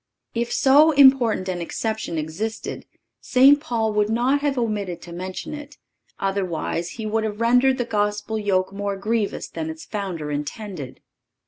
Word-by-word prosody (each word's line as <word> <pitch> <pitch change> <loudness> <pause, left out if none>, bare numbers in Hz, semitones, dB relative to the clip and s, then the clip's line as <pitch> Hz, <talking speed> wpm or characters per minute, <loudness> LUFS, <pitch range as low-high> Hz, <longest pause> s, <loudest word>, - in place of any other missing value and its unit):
If 235 0 -2
so 285 +4 +5
important 265 -8 +5
an 180 -2 -2
exception 220 0 -3
existed, 170 +9 -4 0.3
St. 270 +3 +5
Paul 225 -6 -1
would 210 0 +2
not 245 +5 +2
have 285 -2 0
omitted 210 -7 -2
to 170 - -9
mention 185 - -6
it; 295 -1 -9 0.4
otherwise 185 -3 -2
he 220 - -4
would 220 +1 0
have 210 -1 -3
rendered 250 +3 +4
the 245 - -1
Gospel 210 0 -1
yoke 195 -2 0
more 200 0 -3
grievous 215 +1 -1
than 160 -1 -5
its 160 0 -8
Founder 185 -8 -4
intended. 150 - -6
210 Hz, 150 wpm, -23 LUFS, 185-240 Hz, 0.4 s, so